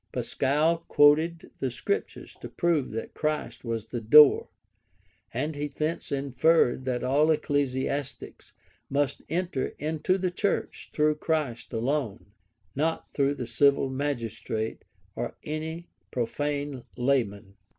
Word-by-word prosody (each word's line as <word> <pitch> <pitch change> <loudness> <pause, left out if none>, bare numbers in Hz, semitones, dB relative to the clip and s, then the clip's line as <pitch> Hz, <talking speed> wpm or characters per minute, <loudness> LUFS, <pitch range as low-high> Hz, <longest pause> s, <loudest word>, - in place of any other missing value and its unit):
Pascal 150 +5 +1
quoted 160 +3 +4
the 130 - 0
Scriptures 405 - -4
to - - -7
prove 170 -6 +1
that 115 +1 -5
Christ 155 0 -2
was 115 -2 -3
the 115 +1 -5
door; 145 +6 +7 0.8
and 145 +7 -2
he 145 +1 -2
thence 155 +3 -3
inferred 140 -1 +2
that 125 -1 -1
all 145 +4 +3
ecclesiastics 140 -2 -2 0.4
must 140 0 0
enter 170 -4 -1
into 160 +5 0
the 185 -1 -1
church 200 +3 -2
through 150 0 +2
Christ 150 -7 -2
alone, 120 -4 -2 0.4
not 160 +3 -1
through 140 0 +1
the 125 - -4
civil 135 +3 +3
magistrate, 115 -5 -3 0.3
or - - -4
any 160 +3 -4 0.2
profane 140 +3 -2
laymen. 115 -7 0
145 Hz, 120 wpm, -27 LUFS, 125-155 Hz, 0.8 s, door